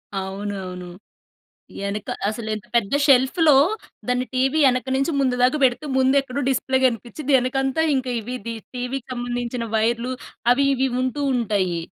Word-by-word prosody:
అవునవును. 190 -2 -5 0.9
యెనక 200 +1 -4 0.2
అసలు 220 0 -4
ఎంత 210 - -8
పెద్ద 210 -1 +1
షెల్ఫ్‌లో 275 +3 +5 0.5
దాన్ని 250 0 0
టీవీ 270 +4 +2
వెనక 255 0 +1
నుంచి 275 +4 0
ముందు 255 -2 +2
దాకా 255 +4 +4
పెడితే 260 +4 +1
ముందెక్కడో 270 +1 +2
డిస్‌ప్లే 260 0 +1
కనిపించిద్ది. 250 +4 -3
వెనకంతా 270 +4 0
ఇక 260 -1 -2
ఇవి‌ 250 +4 -5
ది 230 - -3 0.2
టీవీ‌కి 250 +1 -4
సంబంధించిన 245 -1 -3
వైర్‌లు 235 +3 0 0.4
అవి 275 +2 +2
ఇవి 265 +1 +1
వుంటూ 255 +3 -1
ఉంటాయి. 195 -7 0
250 Hz, 135 wpm, -22 LUFS, 220-265 Hz, 0.9 s, షెల్ఫ్‌లో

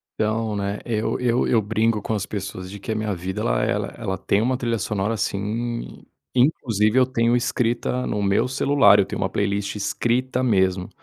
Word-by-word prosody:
Então, 110 0 -1
né, 100 0 -2
eu 110 -2 -1
eu, 125 0 +1
eu 115 - +3
brinco 110 +1 0
com 110 - -3
as 100 -3 -1
pessoas 95 -2 -6
de 100 - -8
que 110 - -5
a - - -1
minha 110 -1 -1
vida 90 +2 -4
ela - - +1
ela - - 0
ela 95 0 -3
tem 100 +2 +1
uma 125 +3 +1
trilha 120 -3 -1
sonora 105 +2 -1
sim, 110 +4 -3 0.3
inclusive 120 -4 +2
eu 130 - +6
tenho 120 -2 +1
escrita 125 0 -1
no 105 - -1
meu 100 +5 +2
celular, 130 -5 +4
eu 100 - +4
tenho - - -5
uma 95 - 0
playlist 100 0 -1
escrita 120 +5 0
mesmo, 95 -6 +1
110 Hz, 190 wpm, -23 LUFS, 100-120 Hz, 0.3 s, eu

